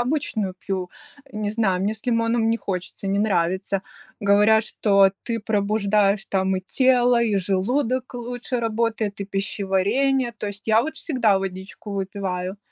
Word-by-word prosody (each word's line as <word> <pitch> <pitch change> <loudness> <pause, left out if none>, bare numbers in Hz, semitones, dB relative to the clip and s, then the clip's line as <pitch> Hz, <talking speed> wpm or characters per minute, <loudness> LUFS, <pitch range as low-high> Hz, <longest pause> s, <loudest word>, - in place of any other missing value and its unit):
обычную 240 -7 -1
пью, 185 -2 -4 0.4
не 215 -1 -2
знаю, 200 -4 +1
мне 205 +2 +1
с 220 +3 -13
лимоном 230 -1 +2
не 230 - +2
хочется, 190 -1 -5
не 195 +1 +1
нравится. 190 -1 0 0.4
Говорят, 210 +2 +4
что 200 -2 +3
ты 230 -1 -3
пробуждаешь 205 -1 +1
там 190 -1 0
и - - -2
тело, 245 +3 +3
и 215 -3 +1
желудок 245 +8 0
лучше 245 +1 -4
работает, 225 -2 -1
и - - -2
пищеварение, 200 +6 0
то - - -4
есть 205 0 -7
я 220 +1 +5
вот 315 - -4
всегда 230 - +2
водичку 190 +2 -6
выпиваю. 190 -1 -3
210 Hz, 145 wpm, -23 LUFS, 195-230 Hz, 0.4 s, я